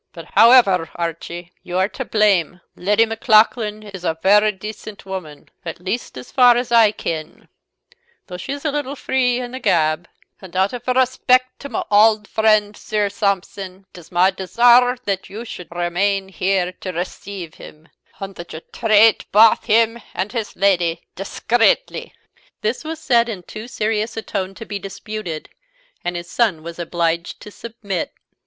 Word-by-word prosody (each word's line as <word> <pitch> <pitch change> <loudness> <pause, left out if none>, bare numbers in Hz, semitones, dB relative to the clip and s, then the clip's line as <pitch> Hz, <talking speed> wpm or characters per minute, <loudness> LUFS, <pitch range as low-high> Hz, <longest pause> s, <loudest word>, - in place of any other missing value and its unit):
"But, - - -10
however, 220 -8 +6
Archie, 170 +1 -5
you 180 - -4
are 190 +1 +3
to 260 - -5
blame: 195 -6 +2
Leddy 210 +5 +2
Maclaughlan 220 -2 +2
is 195 -4 -10
a 160 -2 -1
very 210 +2 +5
decent 210 +1 -9
woman 185 -6 -8
at 165 -2 -6
least, 190 - -4
as 125 - -10
far 245 -2 +6
as 245 0 -2
I 225 -3 +6
ken 160 -6 -6 0.8
though 180 - -8
she 180 - -6
is 285 +2 -8
a 300 - +1
little 285 -1 -3
free 255 -2 0
in 245 -1 -5
the 260 - -6
gab; 160 -7 +1 0.3
and 190 -2 -12
out 190 +4 +1
of 245 0 -7
respect 255 0 +2
to 280 - -8
my 370 - -2
auld 210 0 +5
friend 215 -1 +2
Sir 210 -1 -1
Sampson, 195 -1 -3
it - - -11
is 165 - -17
my 180 +2 +4
desire 240 +6 +4
that 195 -2 -2
you 220 +4 -7
should 180 -6 -8
remain 190 +3 -1
here 185 -1 0
to 185 - -4
receive 180 0 -6
him, 155 +1 -13 0.3
and 195 0 -6
that 170 - -9
you 160 - -7
trait 220 -1 +4
baith 220 +2 +5
him 230 +1 +2
and 190 +3 -2
his 230 -4 -4
Lady 175 -4 +1
discreetly." 230 - 0 0.5
This 220 +7 -2
was 315 0 -5
said 240 -5 +2
in 195 -5 -6
too 215 +6 -9
serious 220 -2 -2
a 225 - -3
tone 195 -2 -4
to 225 - -9
be 205 -2 -5
disputed, 200 -4 -6 0.5
and 175 0 -3
his 175 0 -5
son 185 -6 0
was 170 +1 -8
obliged 170 0 -2
to 210 - -10
submit. 205 -6 -5
205 Hz, 170 wpm, -20 LUFS, 180-230 Hz, 0.8 s, however